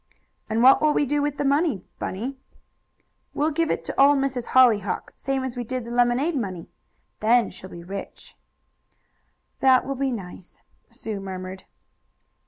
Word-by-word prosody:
"And 225 +2 +1
what 265 +1 +7
will 305 -1 +3
we 290 - +2
do 290 +2 0
with 290 -1 -2
the 285 - -1
money, 280 - +1 0.2
Bunny?" 235 +9 -4 1.0
"We'll 300 +2 +1
give 330 +1 0
it - - -2
to - - 0
Old 285 +1 +6
Miss 275 -1 0
Hollyhock, 230 -6 +2
same 270 -1 -2
as 260 -1 -4
we 245 - -3
did 255 0 -4
the 235 - -7
lemonade 245 +7 +2
money. 190 -9 -4 0.5
Then 235 +2 +3
she'll 185 - -11
sure - - -10
be 170 - -10
rich." 195 +2 -8 1.2
"That 260 -1 +4
will 275 - -2
be 270 0 -1
nice," 185 -5 -9 0.3
Sue 215 -3 -6
murmured. 190 -1 -7
250 Hz, 165 wpm, -24 LUFS, 205-275 Hz, 1.2 s, what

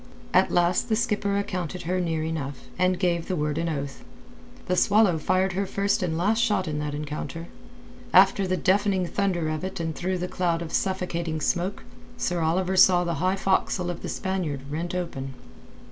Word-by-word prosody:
At - - +5
last 175 +6 +2
the 220 - +3
skipper 210 -3 0
accounted 180 -3 -3
her 180 +2 -1
near 165 -2 -1
enough, 145 -4 -4 0.2
and 185 0 +3
gave 175 -2 0
the 185 - -1
word 150 -2 -1
with 170 +1 -1
an 160 -3 -1
oath. 140 0 -6 0.6
The 180 - 0
Swallow 200 -3 +4
fired 185 +4 +1
her 195 +1 -1
first 200 +1 0
and 165 -3 -1
last 215 +6 +2
shot 210 -6 +1
in 150 -1 -2
that 150 -1 -3
encounter. 150 +3 -5 0.6
After 195 -1 +5
the 185 0 0
deafening 195 -1 +2
thunder 175 -3 0
of 155 +2 -3
it 190 -1 -4
and 165 -1 -2
through 185 +1 -1
the 180 0 -3
cloud 170 -2 -1
of 160 - -8
suffocating 170 -4 -1
smoke, 180 +5 -1 0.3
Sir 180 -7 -1
Oliver 180 +4 +1
saw 180 -1 +6
the 170 -1 -1
high 185 +1 +2
forecastle 190 -2 0
of 175 - -8
the - - -5
Spaniard 180 -8 -2
rent 170 +4 -3
open. 135 -7 -4
180 Hz, 190 wpm, -26 LUFS, 160-190 Hz, 0.6 s, saw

